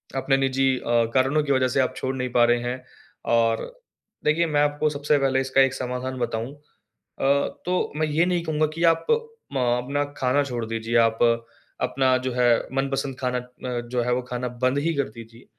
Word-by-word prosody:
अपने 135 Hz, 0 st, +2 dB
निजी 135 Hz, 0 st, +2 dB
अ, 120 Hz, -1 st, +2 dB
कारणों 135 Hz, +3 st, +2 dB
की 145 Hz, -, -1 dB
वजह 130 Hz, -1 st, +3 dB
से 130 Hz, -, 0 dB
आप 130 Hz, -, +1 dB
छोड़ 130 Hz, 0 st, -2 dB
नहीं 125 Hz, -1 st, -2 dB
पा 120 Hz, 0 st, +4 dB
रहे 120 Hz, 0 st, +3 dB
हैं। 125 Hz, +1 st, -4 dB, 0.5 s
और 115 Hz, -1 st, +3 dB, 0.6 s
देखिए 160 Hz, +3 st, +3 dB
मैं 145 Hz, -2 st, +2 dB
आपको 145 Hz, +1 st, +1 dB
सबसे 145 Hz, 0 st, +1 dB
पहले 135 Hz, -1 st, +2 dB
इसका 135 Hz, 0 st, +2 dB
एक 135 Hz, -1 st, +3 dB
समाधान 130 Hz, 0 st, -4 dB
बताऊँ 120 Hz, +2 st, -3 dB, 0.7 s
अ, -, -, -3 dB, 0.4 s
तो 180 Hz, +1 st, 0 dB
मैं 155 Hz, 0 st, +1 dB
ये 155 Hz, +3 st, +2 dB
नहीं 175 Hz, -1 st, 0 dB
कहूँगा 155 Hz, -1 st, +1 dB
कि 165 Hz, -, -2 dB
आप 165 Hz, -, -9 dB, 0.5 s
म 135 Hz, -, 0 dB, 0.2 s
अपना 140 Hz, +3 st, -1 dB
खाना 130 Hz, +2 st, +2 dB
छोड़ 120 Hz, -4 st, -4 dB
दीजिए, 115 Hz, +1 st, -3 dB
आप 115 Hz, -1 st, +3 dB, 0.6 s
अपना 130 Hz, -1 st, +2 dB
जो 130 Hz, -, 0 dB
है 120 Hz, -1 st, +3 dB
मनपसंद 135 Hz, 0 st, -1 dB
खाना 125 Hz, -2 st, -1 dB
अ, 125 Hz, 0 st, -6 dB
जो 125 Hz, 0 st, 0 dB
है 125 Hz, +1 st, 0 dB
वो 125 Hz, -, 0 dB
खाना 125 Hz, 0 st, -3 dB, 0.2 s
बंद 130 Hz, +2 st, +2 dB
ही 165 Hz, +3 st, 0 dB
कर 140 Hz, -1 st, -1 dB
दीजिए। 115 Hz, +2 st, -13 dB
130 Hz, 195 wpm, -24 LUFS, 125-140 Hz, 0.7 s, पा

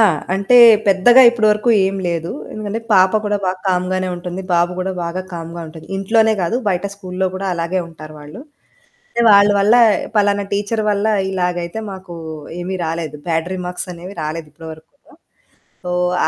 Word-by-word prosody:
ఆ! -, -, +7 dB, 0.3 s
అంటే, 200 Hz, +6 st, +3 dB, 0.3 s
పెద్దగా 200 Hz, +7 st, +6 dB
ఇప్పడవరకు 215 Hz, 0 st, +2 dB, 0.2 s
ఏం 195 Hz, +1 st, -2 dB
లేదు. 170 Hz, 0 st, -3 dB, 0.2 s
ఎందుకంటే, 215 Hz, +1 st, -5 dB
పాప 190 Hz, -1 st, +5 dB
కూడా 205 Hz, 0 st, 0 dB
బాగా 185 Hz, 0 st, -2 dB
కామ్‌గానే 185 Hz, 0 st, -1 dB
ఉంటుంది, 180 Hz, +1 st, -6 dB
బాబు 175 Hz, +1 st, +2 dB
గూడా 190 Hz, +1 st, -2 dB
బాగా 175 Hz, +2 st, -4 dB
కామ్‌గా 170 Hz, 0 st, -7 dB
ఉంటది. 160 Hz, 0 st, -12 dB
ఇంట్లోనే 220 Hz, +3 st, +2 dB
గాదు, 180 Hz, +6 st, 0 dB
బయట 185 Hz, -1 st, -1 dB
స్కూల్‌లో 190 Hz, -1 st, -3 dB
గూడా 195 Hz, +1 st, -4 dB
అలాగే 170 Hz, +2 st, -2 dB
ఉంటారు 155 Hz, -2 st, -12 dB
వాళ్ళు. 150 Hz, +7 st, -11 dB, 0.8 s
ఏ -, -, +3 dB
వాళ్ళ 200 Hz, 0 st, +6 dB
వల్లా 215 Hz, +5 st, +4 dB, 0.4 s
పలానా 205 Hz, -1 st, +2 dB
టీచర్ 205 Hz, +2 st, -1 dB
వల్లా 205 Hz, +2 st, +1 dB, 0.2 s
ఇలాగైతే 180 Hz, 0 st, -2 dB
మాకూ 190 Hz, -2 st, -9 dB, 0.5 s
ఏమి 185 Hz, +2 st, -4 dB
రాలేదు, 160 Hz, -2 st, -4 dB
బ్యాడ్ 165 Hz, +1 st, -1 dB
రిమార్క్సనేవి 180 Hz, +1 st, -6 dB
రాలేదు 155 Hz, +1 st, -5 dB
ఇప్పడవరకు 160 Hz, 0 st, -11 dB
కూడా. 285 Hz, -, -23 dB, 0.8 s
ఓహ్, 180 Hz, 0 st, 0 dB
185 Hz, 150 wpm, -18 LUFS, 170-200 Hz, 0.8 s, ఆ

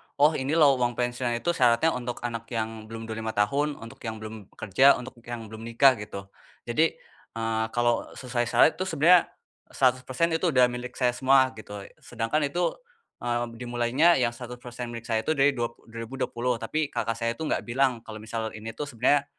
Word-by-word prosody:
oh 150 Hz, +2 st, +5 dB
ini 140 Hz, +4 st, -1 dB
loh 140 Hz, -5 st, +5 dB
uang 120 Hz, -1 st, 0 dB
pensiun 120 Hz, 0 st, -1 dB
itu 145 Hz, +9 st, 0 dB
syaratnya 125 Hz, 0 st, +3 dB
untuk 120 Hz, -2 st, -5 dB
anak 115 Hz, -1 st, -4 dB
yang 110 Hz, -1 st, -4 dB
belum 115 Hz, 0 st, -7 dB
25 110 Hz, 0 st, -4 dB
tahun, 140 Hz, +9 st, +1 dB
untuk 115 Hz, -, -11 dB
yang 110 Hz, -, -3 dB
belum 110 Hz, -2 st, -8 dB
kerja, 130 Hz, +7 st, +5 dB
untuk 125 Hz, 0 st, -9 dB
yang 120 Hz, -1 st, -5 dB
belum 110 Hz, +1 st, -8 dB
nikah 130 Hz, +2 st, +5 dB
gitu. 100 Hz, -2 st, -8 dB, 0.3 s
Jadi, 155 Hz, +8 st, +1 dB, 0.4 s
eee, 115 Hz, -1 st, 0 dB
kalau 120 Hz, -1 st, +2 dB
sesuai 125 Hz, -2 st, -2 dB
syarat -, -, +6 dB
itu 185 Hz, -, 0 dB
sebenarnya 165 Hz, +3 st, +5 dB, 0.4 s
100% 130 Hz, +4 st, +1 dB
itu 165 Hz, +3 st, +1 dB
udah 125 Hz, -1 st, +5 dB
milik 125 Hz, 0 st, -6 dB
saya 125 Hz, -2 st, +2 dB
semua, 130 Hz, +1 st, +4 dB
gitu 105 Hz, -1 st, -8 dB
e -, -, -14 dB
sedangkan 125 Hz, +6 st, -1 dB
itu, 175 Hz, +4 st, 0 dB, 0.5 s
eee, 120 Hz, 0 st, -1 dB
b -, -, -12 dB
dimulainya 125 Hz, +7 st, +3 dB
yang 120 Hz, -1 st, +2 dB
100% 120 Hz, 0 st, -8 dB
milik 115 Hz, -1 st, -7 dB
saya 110 Hz, -, +2 dB
itu 155 Hz, -, +2 dB
dari 140 Hz, 0 st, +4 dB
dua 120 Hz, -3 st, -1 dB
p -, -, -34 dB
2020, 120 Hz, +1 st, -3 dB
tapi 150 Hz, +6 st, -1 dB
kakak 115 Hz, -5 st, -2 dB
saya 115 Hz, 0 st, -1 dB
itu 160 Hz, -, -6 dB
gak -, -, -1 dB
bilang 125 Hz, 0 st, +1 dB
kalau 110 Hz, -1 st, -8 dB
misal 110 Hz, 0 st, -4 dB
ini 110 Hz, +1 st, -7 dB
tuh 150 Hz, -, -3 dB
sebenarnya, 140 Hz, +2 st, +2 dB
120 Hz, 190 wpm, -27 LUFS, 115-135 Hz, 0.5 s, syarat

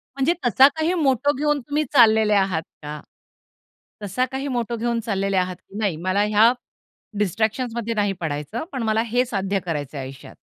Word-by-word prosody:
म्हणजे 275 Hz, +5 st, +2 dB
तसा 260 Hz, +3 st, +7 dB
काही 320 Hz, +2 st, 0 dB
मोटो 275 Hz, 0 st, +2 dB
घेऊन 295 Hz, 0 st, +1 dB
तुम्ही 290 Hz, +4 st, -1 dB
चाललेले 220 Hz, -4 st, +5 dB
आहात 190 Hz, -5 st, +2 dB, 0.2 s
का? 150 Hz, 0 st, -6 dB, 1.0 s
तसा 205 Hz, +6 st, 0 dB
काही 270 Hz, +1 st, -3 dB
मोटो 240 Hz, -3 st, -2 dB
घेऊन 235 Hz, 0 st, -1 dB
चाललेले 195 Hz, -2 st, 0 dB
आहात? 180 Hz, 0 st, 0 dB, 0.2 s
नाही, 200 Hz, -6 st, 0 dB
मला 195 Hz, +2 st, +2 dB
ह्या 215 Hz, +2 st, +5 dB, 0.7 s
डिस्ट्रॅक्शन्समध्ये 225 Hz, +3 st, -1 dB
नाही 205 Hz, -2 st, +1 dB
पडायचं, 150 Hz, -, -3 dB
पण 255 Hz, -3 st, -3 dB
मला 220 Hz, 0 st, +1 dB
हे 245 Hz, +3 st, +1 dB
साध्य 195 Hz, -4 st, -1 dB
करायचंय 145 Hz, -4 st, -4 dB
आयुष्यात. 130 Hz, 0 st, -9 dB
220 Hz, 155 wpm, -22 LUFS, 195-250 Hz, 1.0 s, तसा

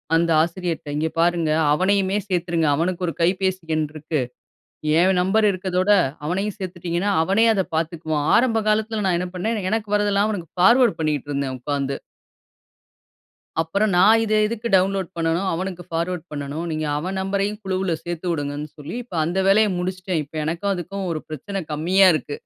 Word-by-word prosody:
அந்த 165 Hz, 0 st, +2 dB
ஆசிரியர்ட்ட, 170 Hz, -2 st, -3 dB
"இங்கே 160 Hz, +1 st, 0 dB
பாருங்க! 170 Hz, -2 st, +2 dB, 0.2 s
அவனையுமே 195 Hz, +3 st, +2 dB
சேத்துருங்க. 170 Hz, -4 st, 0 dB
அவனுக்கு 175 Hz, +4 st, -1 dB
1 165 Hz, -, -2 dB
கைபேசி 185 Hz, +1 st, +1 dB
எண் 155 Hz, -1 st, +1 dB
இருக்கு. 155 Hz, 0 st, -3 dB, 0.8 s
என் 185 Hz, +1 st, +3 dB
நம்பர் 205 Hz, +4 st, +3 dB
இருக்கிறதோட, 185 Hz, 0 st, -1 dB, 0.4 s
அவனையும் 195 Hz, +5 st, -2 dB
சேத்துட்டீங்கன்னா, 180 Hz, 0 st, -2 dB
அவனே 195 Hz, +6 st, +3 dB
அத 190 Hz, -, +1 dB
பாத்துக்குவான்" 160 Hz, -2 st, -2 dB
ஆரம்ப 225 Hz, -2 st, +2 dB
காலத்தில 215 Hz, 0 st, 0 dB
நான் 175 Hz, -2 st, +2 dB
என்ன 180 Hz, -, -3 dB
பண்ணேன், 215 Hz, +4 st, -1 dB
எனக்கு 215 Hz, -2 st, -1 dB
வரதெல்லாம் 205 Hz, 0 st, +2 dB
அவனுக்கு 175 Hz, -6 st, -5 dB
ஃபார்வர்ட் 235 Hz, +1 st, +5 dB
பண்ணிக்கிட்ருந்தேன் 145 Hz, -3 st, -2 dB
உக்காந்து. 140 Hz, +1 st, -2 dB, 1.6 s
அப்பறம் 195 Hz, +6 st, +1 dB
நான் 210 Hz, +5 st, +6 dB
இத 215 Hz, -, -1 dB
எதுக்கு 230 Hz, +1 st, -4 dB
டவுன்லோட் 190 Hz, -1 st, +1 dB
பண்ணனும், 165 Hz, +3 st, 0 dB
அவனுக்கு 180 Hz, +1 st, -4 dB
பார்வர்ட் 170 Hz, +1 st, -2 dB
பண்ணணும். 145 Hz, +3 st, -4 dB
நீங்க 155 Hz, 0 st, -2 dB
அவன் 185 Hz, +5 st, -3 dB
நம்பரயும் 200 Hz, +2 st, -1 dB
குழுவுல 190 Hz, -2 st, -1 dB
சேர்த்து 175 Hz, +1 st, -5 dB
வுடுங்கன்னு 145 Hz, -1 st, -3 dB
சொல்லி 150 Hz, +7 st, -7 dB
இப்ப 185 Hz, -8 st, -7 dB
அந்த 175 Hz, +4 st, -1 dB
வேலைய 210 Hz, +2 st, +5 dB
முடிச்சிட்டேன். 185 Hz, -1 st, -2 dB
இப்ப 150 Hz, -, -16 dB
எனக்கும் 170 Hz, +6 st, -1 dB
அதுக்கும் 190 Hz, +2 st, -5 dB
ஒரு 155 Hz, -, -3 dB
பிரச்சன 190 Hz, +6 st, -5 dB
கம்மியா 185 Hz, +6 st, +4 dB
இருக்கு 145 Hz, 0 st, -4 dB
180 Hz, 150 wpm, -22 LUFS, 160-195 Hz, 1.6 s, நான்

